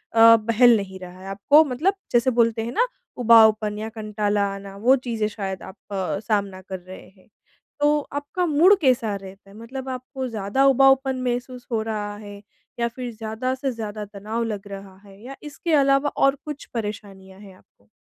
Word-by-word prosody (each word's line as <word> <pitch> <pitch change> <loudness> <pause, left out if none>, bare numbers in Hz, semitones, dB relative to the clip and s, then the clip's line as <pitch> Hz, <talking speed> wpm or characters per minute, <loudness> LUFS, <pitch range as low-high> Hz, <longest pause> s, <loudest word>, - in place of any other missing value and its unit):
अ, 230 0 +8
बहल 230 +2 +4
नहीं 190 -2 -6
रहा 180 0 -11
है, 190 - -11
आपको 285 +11 +5
मतलब 295 +10 0 0.2
जैसे 240 +2 +3
बोलते 230 -1 +3
हैं 235 - -4
ना - - +2 0.3
उबाऊपन 220 -3 +5
या 220 +1 -4
कंटाला 210 -1 -1
आना, 195 0 -10
वो 250 +6 +4
चीज़ें 230 -4 -2
शायद 195 -3 -5
आप 190 +2 -11 0.5
सामना 200 -3 -1
कर 190 0 -7
रहे 185 +1 -12
हैं, 190 -1 -25 0.5
तो 295 +1 +3
आपका 290 +5 -2
मूड 340 +6 +5
कैसा 240 -7 +1
रहता 195 0 -11
है, 200 - -16
मतलब 260 +3 -8
आपको 255 +1 -5
ज़्यादा 220 +4 0
उबाऊपन 270 -1 +4
महसूस 245 0 -4
हो 220 -1 0
रहा 210 -2 -4
है 205 -1 -11 0.4
या 235 - +1
फिर 245 0 -6
ज़्यादा 225 +4 -3
से 265 0 -2
ज़्यादा 215 -2 -6
तनाव 210 +3 -4
लग 205 -3 -5
रहा 195 -1 -10
है 195 +1 -16
या 270 +2 -8
इसके 305 +2 -4
अलावा 275 0 +3
और 275 0 +3
कुछ 300 -1 -7
परेशानियाँ 200 -3 -6
हैं 195 -3 -14
आपको? 100 - -30
225 Hz, 180 wpm, -23 LUFS, 200-260 Hz, 0.5 s, अ